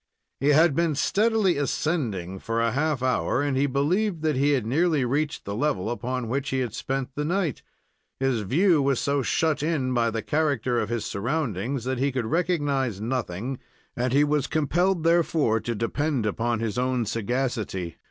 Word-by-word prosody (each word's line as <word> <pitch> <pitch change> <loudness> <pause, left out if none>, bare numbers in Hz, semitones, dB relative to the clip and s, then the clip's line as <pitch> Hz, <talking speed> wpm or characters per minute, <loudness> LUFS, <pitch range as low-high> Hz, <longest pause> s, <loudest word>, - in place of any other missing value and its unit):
He 140 - 0
had 155 +2 +5
been 165 -2 +1
steadily 210 +2 +2
ascending 115 - -2
for 115 +3 -2
a 115 0 +2
half 145 0 0
hour, 130 +1 +1
and 145 -2 0
he 140 +2 +2
believed 160 +6 0
that 155 -2 +1
he 140 +3 +3
had 130 -6 0
nearly 150 +2 +2
reached 145 +4 -1
the 100 - -4
level 115 -3 -1
upon 120 +1 -3
which 135 +4 -2
he 135 - -1
had 120 -4 -3
spent 135 0 -3
the 150 - -2
night. 170 - -1 0.6
His 130 -4 +1
view 160 - +3
was 135 -2 +1
so 140 0 +1
shut 155 +3 +1
in 145 -5 0
by 120 -1 +2
the 115 0 -3
character 140 -6 0
of 110 - -2
his 120 -2 -2
surroundings, 120 - -2
that 130 0 -2
he 140 +1 +1
could 125 -3 -2
recognize 145 - 0
nothing, 120 +1 -3 0.4
and 125 0 -1
he 140 +3 +4
was 150 -1 +1
compelled, 175 +4 +1
therefore, 165 -8 +2
to 120 +1 -3
depend 130 +3 -1
upon 115 +2 -1
his 115 0 -2
own 125 -2 0
sagacity. 115 -5 -2
135 Hz, 180 wpm, -25 LUFS, 115-155 Hz, 0.6 s, had